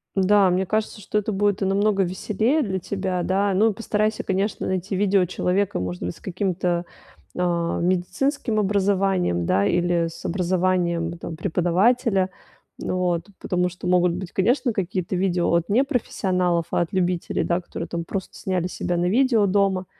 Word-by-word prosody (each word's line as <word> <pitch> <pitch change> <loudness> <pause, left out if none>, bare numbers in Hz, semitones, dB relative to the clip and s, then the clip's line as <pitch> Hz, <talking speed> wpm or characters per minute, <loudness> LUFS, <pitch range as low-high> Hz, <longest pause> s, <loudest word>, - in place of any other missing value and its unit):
Да, 195 0 +4
мне 185 +2 +1
кажется, 215 +1 -2
что 210 - -2
это 210 0 -1
будет 205 0 +1
намного 195 +1 +2
веселее 215 - 0
для 190 -5 -2
тебя. 185 -1 -2
Да, 195 +1 +1
ну, 215 +3 +3
постарайся, 215 0 -1
конечно, 195 +2 -1
найти 190 +1 -2
видео 195 -1 +3
человека, 185 - 0
может 90 0 -4
быть, 90 0 -3
с - - -18
каким-то, 180 -2 -1 0.5
э, 170 -1 0
медицинским 215 - 0
образованием, 195 - +1
да, 100 +3 +2
или 175 +3 +1
с 165 - -10
образованием, 175 -2 0
там, 165 -1 -6
преподавателя. 190 +5 +2 0.5
Вот, 180 -1 -1
потому 180 0 0
что 180 0 -7
могут 180 -1 +3
быть, 180 0 -6
конечно, 245 +6 +1
какие-то 185 -1 -2
видео 180 -2 +1
от 170 0 +2
непрофессионалов, 190 - +1
а - - +1
от 170 - -3
любителей, 180 -2 0
да, 175 +1 0
которые 170 -1 -6 0.2
просто 195 -2 -5
сняли 185 -2 -1
себя 175 -1 -3
на 175 +1 +1
видео 235 -2 +3
дома. 190 -1 +1
185 Hz, 155 wpm, -23 LUFS, 175-200 Hz, 0.5 s, Да